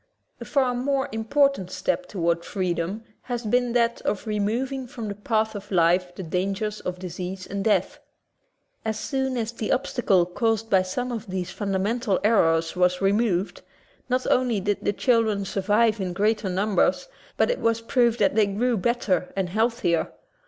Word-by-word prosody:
A -, -, -7 dB
far 260 Hz, -3 st, +1 dB
more 265 Hz, +2 st, 0 dB
important 225 Hz, -2 st, +1 dB
step 275 Hz, +6 st, -2 dB
toward 170 Hz, -3 st, 0 dB
freedom 185 Hz, +3 st, -2 dB, 0.2 s
has 240 Hz, -2 st, -4 dB
been 245 Hz, +2 st, +1 dB
that 235 Hz, -1 st, +1 dB
of 205 Hz, +2 st, -2 dB
remov 215 Hz, +5 st, -1 dB
ing 265 Hz, -2 st, -4 dB
from 235 Hz, -4 st, -6 dB
the 205 Hz, -, -3 dB
path 220 Hz, +1 st, 0 dB
of 205 Hz, -1 st, -8 dB
life 180 Hz, 0 st, +2 dB
the 190 Hz, -, -6 dB
dangers 195 Hz, +5 st, -2 dB
of 180 Hz, 0 st, -4 dB
dis 180 Hz, -1 st, -8 dB
ease 185 Hz, +1 st, -5 dB
and 200 Hz, 0 st, -4 dB
death. 215 Hz, 0 st, +1 dB, 0.8 s
As 220 Hz, -1 st, -2 dB
soon 265 Hz, -2 st, -1 dB
as 230 Hz, -1 st, -2 dB
the 230 Hz, -2 st, -4 dB
obstacle 235 Hz, -8 st, +2 dB
caused 225 Hz, +4 st, -1 dB
by 190 Hz, -2 st, +5 dB
some 245 Hz, +7 st, -3 dB
of 230 Hz, -4 st, -5 dB
these 185 Hz, -1 st, -3 dB
fundamental 200 Hz, +2 st, -1 dB
errors 165 Hz, -7 st, +3 dB
was 180 Hz, 0 st, +2 dB
removed, 195 Hz, -1 st, +1 dB, 0.5 s
not 255 Hz, +1 st, 0 dB
only 250 Hz, -4 st, +2 dB
did 205 Hz, +1 st, -1 dB
the -, -, +2 dB
children 220 Hz, -4 st, +1 dB
survive 210 Hz, +3 st, +1 dB
in 180 Hz, -2 st, -2 dB
greater 210 Hz, +1 st, +1 dB
num 195 Hz, +3 st, -1 dB
bers, -, -, +2 dB, 0.3 s
but -, -, +3 dB
it -, -, -2 dB
was 230 Hz, 0 st, +1 dB
proved 235 Hz, 0 st, +2 dB
that 285 Hz, -, +2 dB
they 215 Hz, -2 st, +3 dB
grew 230 Hz, +4 st, 0 dB
better 190 Hz, -4 st, 0 dB
and 190 Hz, -2 st, -1 dB
healthier. 220 Hz, -4 st, 0 dB
210 Hz, 175 wpm, -25 LUFS, 185-235 Hz, 0.8 s, by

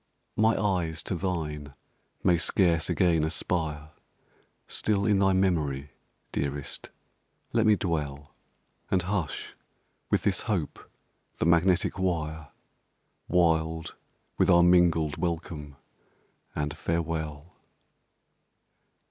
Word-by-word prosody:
My 110 Hz, +1 st, +3 dB
eyes 90 Hz, -6 st, 0 dB
to 95 Hz, -, -2 dB
thine 75 Hz, -6 st, -3 dB, 0.5 s
may 85 Hz, -2 st, +4 dB
scarce 85 Hz, 0 st, +2 dB
again 85 Hz, -4 st, +3 dB
aspire 80 Hz, -2 st, -2 dB, 0.8 s
Still 100 Hz, -2 st, 0 dB
in 105 Hz, -2 st, +3 dB
thy 95 Hz, 0 st, +4 dB
memory, 75 Hz, -7 st, 0 dB, 0.4 s
dearest 70 Hz, 0 st, -4 dB, 0.6 s
let 115 Hz, -1 st, +3 dB
me 105 Hz, -, +6 dB
dwell, 75 Hz, -6 st, -3 dB, 0.6 s
And 95 Hz, -2 st, +2 dB
hush, 90 Hz, -4 st, -3 dB, 0.6 s
with -, -, +1 dB
this -, -, 0 dB
hope, 90 Hz, -9 st, -1 dB, 0.6 s
the -, -, 0 dB
magnetic 85 Hz, +3 st, +3 dB
wire, 80 Hz, -4 st, -2 dB, 0.8 s
Wild 80 Hz, -2 st, +1 dB, 0.4 s
with -, -, +4 dB
our 85 Hz, -1 st, +7 dB
mingled 85 Hz, -4 st, +4 dB
welcome 80 Hz, -4 st, -4 dB, 0.8 s
and 75 Hz, +1 st, -2 dB
farewell! 80 Hz, -1 st, -3 dB
85 Hz, 95 wpm, -28 LUFS, 75-90 Hz, 0.8 s, our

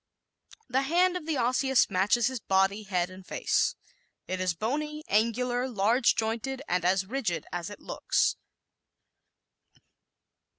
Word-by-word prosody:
The 265 Hz, +1 st, +1 dB
hand 350 Hz, +6 st, +2 dB
of 340 Hz, -3 st, -5 dB
the 315 Hz, -3 st, 0 dB
Osseous 255 Hz, +1 st, +3 dB
matches 205 Hz, +5 st, +2 dB
his 260 Hz, 0 st, -1 dB
body, 195 Hz, +1 st, +1 dB
head 185 Hz, -3 st, -1 dB
and 185 Hz, +1 st, -11 dB
face. -, -, 0 dB, 0.5 s
It 185 Hz, 0 st, -3 dB
is 185 Hz, -2 st, 0 dB
bony, 300 Hz, -, -3 dB
angular, 245 Hz, +4 st, +1 dB
large 230 Hz, +2 st, +2 dB
jointed 235 Hz, +4 st, -2 dB
and 180 Hz, -1 st, 0 dB
as 185 Hz, +2 st, +2 dB
rigid 220 Hz, -5 st, -2 dB
as 175 Hz, 0 st, -3 dB
it 205 Hz, -, -10 dB
looks. -, -, 0 dB
225 Hz, 130 wpm, -28 LUFS, 190-265 Hz, 0.5 s, Osseous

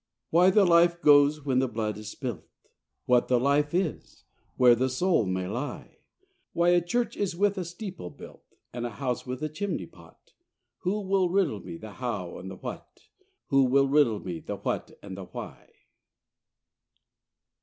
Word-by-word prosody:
Why 175 Hz, +3 st, +6 dB
the 195 Hz, +1 st, +5 dB
life 170 Hz, 0 st, +4 dB
goes 145 Hz, -1 st, +5 dB
when 130 Hz, -2 st, +2 dB
the 130 Hz, -, +1 dB
blood 110 Hz, -2 st, -3 dB
is 105 Hz, 0 st, -8 dB
spilt? 120 Hz, -, -6 dB, 0.6 s
What 125 Hz, -1 st, +3 dB
the 125 Hz, -1 st, +3 dB
life 145 Hz, +3 st, +2 dB
is? 175 Hz, -2 st, -3 dB, 0.3 s
where 125 Hz, -1 st, +7 dB
the 130 Hz, +2 st, +1 dB
soul 130 Hz, -, +1 dB
may 95 Hz, 0 st, -2 dB
lie? 125 Hz, +9 st, -6 dB, 0.5 s
Why 170 Hz, +1 st, +3 dB
a 175 Hz, 0 st, +4 dB
church 235 Hz, +6 st, -1 dB
is 195 Hz, -4 st, -2 dB
with 200 Hz, +2 st, +2 dB
a -, -, -2 dB
steeple 180 Hz, -, -7 dB
built; -, -, -13 dB, 0.3 s
And 120 Hz, 0 st, -4 dB
a 120 Hz, -, -10 dB
house 130 Hz, -2 st, -3 dB
with 130 Hz, +3 st, -5 dB
a -, -, +1 dB
chimney 195 Hz, +6 st, -3 dB
pot? -, -, -20 dB, 0.5 s
Who 200 Hz, +3 st, -1 dB
will 190 Hz, -2 st, +1 dB
riddle 175 Hz, -, +1 dB
me 85 Hz, -, -8 dB
the 110 Hz, +4 st, -10 dB
how 105 Hz, -9 st, -5 dB
and 95 Hz, +1 st, -8 dB
the 95 Hz, -, -8 dB
what? -, -, -10 dB, 0.4 s
Who 135 Hz, -2 st, +4 dB
will 135 Hz, +2 st, +3 dB
riddle 135 Hz, -7 st, +3 dB
me 85 Hz, -3 st, -6 dB
the -, -, -5 dB
what -, -, -3 dB
and 95 Hz, -, -7 dB
the 95 Hz, -1 st, -8 dB
why? -, -, -9 dB
140 Hz, 175 wpm, -27 LUFS, 120-175 Hz, 0.6 s, where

